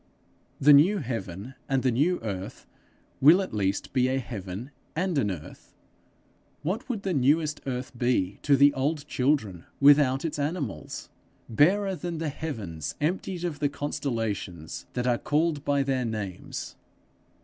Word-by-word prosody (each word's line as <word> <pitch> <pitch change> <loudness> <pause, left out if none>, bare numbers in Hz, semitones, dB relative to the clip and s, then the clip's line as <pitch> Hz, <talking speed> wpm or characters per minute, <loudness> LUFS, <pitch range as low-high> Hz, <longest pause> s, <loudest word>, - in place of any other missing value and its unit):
The 145 +2 +7
new 170 +9 +6
heaven 115 - -5 0.2
and 135 -2 +1
the 130 - +3
new 155 +10 +2
earth 95 -4 -5 0.6
will 155 +7 +8
at 190 - -3
least 100 -1 -1
be 130 -1 +3
a 130 +1 +1
heaven 105 0 -6 0.2
and 180 +1 0
an 105 - +1
earth! 85 -6 -9 0.9
What 190 - -2
would 220 -5 -3
the 190 - 0
newest 150 +2 +2
earth 125 -1 -4
be 120 -6 0
to 140 -1 +4
the 140 +1 +6
old 145 +3 -1
children 125 - 0 0.2
without 140 -1 +5
its 155 -2 -3
animals? 150 +1 -4 0.4
Barer 190 - +3
than 175 -1 -4
the 160 -1 -2
heavens 95 - -5
emptied 180 +3 -2
of 165 -5 -3
the 145 - +1
constellations 115 - -4
that 125 0 -2
are 120 -1 +2
called 150 -1 0
by 140 -1 +2
their 135 -2 0
names. 105 -5 -5
140 Hz, 150 wpm, -27 LUFS, 115-155 Hz, 0.9 s, will